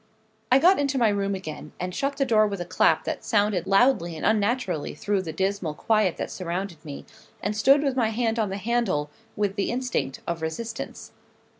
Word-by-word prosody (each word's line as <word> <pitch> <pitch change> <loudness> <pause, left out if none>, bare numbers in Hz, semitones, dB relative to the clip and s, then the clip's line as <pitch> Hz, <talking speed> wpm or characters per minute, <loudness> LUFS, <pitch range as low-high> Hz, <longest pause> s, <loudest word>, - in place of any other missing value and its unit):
I 255 - +8
got 350 +6 +5
into 275 -1 0
my 235 -3 +4
room 200 -1 0
again, 155 -4 -7
and 180 0 -3
shut 275 +5 -2
the 275 - +2
door 215 -4 +4
with 200 -2 -4
a 175 - -3
clap 180 - +2
that - - -4
sounded 205 -5 +1
loudly 195 -5 +3
and - - -4
unnaturally 210 - 0
through 205 -2 0
the 165 -3 -5
dismal 190 -2 -2
quiet 215 -1 +1
that - - -4
surrounded 180 -1 -4
me, 145 -3 -8 0.3
and 205 +2 -2
stood 275 +7 +5
with 275 -3 0
my 235 -4 +2
hand 225 0 0
on 215 -3 +1
the 195 - -3
handle, 200 -9 0 0.2
with 205 -1 -1
the 200 - 0
instinct 245 - -2
of 170 -1 -3
resistance. 220 +9 -5
205 Hz, 195 wpm, -25 LUFS, 180-235 Hz, 0.3 s, I